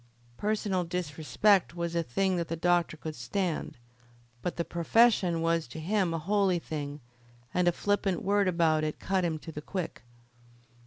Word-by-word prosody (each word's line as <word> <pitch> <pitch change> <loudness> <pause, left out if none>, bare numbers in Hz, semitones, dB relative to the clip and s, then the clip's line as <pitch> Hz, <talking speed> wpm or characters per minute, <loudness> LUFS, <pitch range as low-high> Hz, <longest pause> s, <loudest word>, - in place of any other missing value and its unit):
Personal 205 -3 0
disrespect 175 +3 +1
was 170 -1 -2
a 170 - +1
thing 185 +7 0
that 170 -1 -2
the 165 - -2
doctor 175 -1 +1
could 155 0 -6
stand; 165 +8 -2 0.6
but 180 - -3
the 170 - -2
profession 175 -1 +3
was 165 -3 +1
to 125 - -8
him 185 +2 +1
a 165 - -1
holy 190 +2 +2
thing, 145 -3 -5 0.5
and 180 -1 +2
a - - +6
flippant 200 0 0
word 200 0 +2
about 165 -3 +2
it 155 -1 -2
cut 190 -1 0
him 165 -2 0
to 160 +1 -9
the 150 - -6
quick. 180 +2 -5
170 Hz, 165 wpm, -29 LUFS, 160-190 Hz, 0.6 s, a